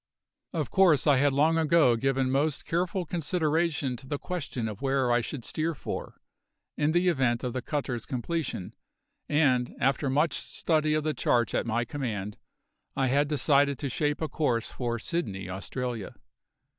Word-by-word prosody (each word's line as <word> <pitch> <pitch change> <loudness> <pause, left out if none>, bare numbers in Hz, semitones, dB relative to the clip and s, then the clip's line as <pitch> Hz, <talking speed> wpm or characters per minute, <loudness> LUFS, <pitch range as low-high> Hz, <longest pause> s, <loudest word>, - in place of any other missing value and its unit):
Of - - -3
course 175 -8 +4
I 145 -3 +5
had 140 +2 +3
long 155 +4 +3
ago 160 -6 +4
given 135 +2 0
most 145 +2 0
careful 180 +2 -1
consideration 160 -4 0
to 130 - -13
the 145 - -2
question 140 -9 -4
of 105 +2 -7
where 135 -2 +1
I 120 0 +3
should 120 +1 -6
steer 160 +1 -2
for, - - -6 0.6
in 150 +1 +1
the 175 +2 +2
event 130 -8 +2
of 125 -2 -2
the 130 - -2
cutter's 130 -4 -3
completion, 140 - -3 0.6
and 130 -5 +2
after 135 +1 +1
much 145 +3 +2
study 155 -1 0
of 155 - 0
the 155 0 0
charts 120 -3 +1
at - - 0
my 115 +1 0
command 110 -7 -4 0.6
I 135 -1 +1
had 145 +3 +3
decided 140 -1 +3
to 140 - -3
shape 145 +4 -1
a - - 0
course 125 -8 0
for 120 -2 -2
Sydney, 110 - -3
Australia. 115 +3 -4
140 Hz, 165 wpm, -28 LUFS, 125-155 Hz, 0.6 s, I